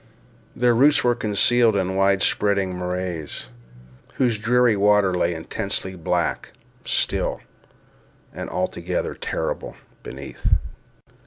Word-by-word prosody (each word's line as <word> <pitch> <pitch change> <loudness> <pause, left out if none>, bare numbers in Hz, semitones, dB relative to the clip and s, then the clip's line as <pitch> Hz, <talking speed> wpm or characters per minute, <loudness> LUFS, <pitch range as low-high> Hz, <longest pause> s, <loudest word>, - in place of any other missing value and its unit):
Their 120 -1 +3
roots 140 +5 +4
were 120 - +3
concealed 115 0 +3
in 95 -1 -1
wide 95 0 +3
spreading 100 -3 +1
morasses, 90 -6 -4 0.7
whose 120 -4 +1
dreary 120 0 +3
water 100 -1 +3
lay 90 -1 +1
intensely 95 +3 -3
black, 85 -3 -2 0.3
still, - - 0 0.9
and - - -6
altogether 90 0 -2
terrible, - - -4 0.3
beneath. 70 +1 -2
100 Hz, 100 wpm, -23 LUFS, 90-115 Hz, 0.9 s, roots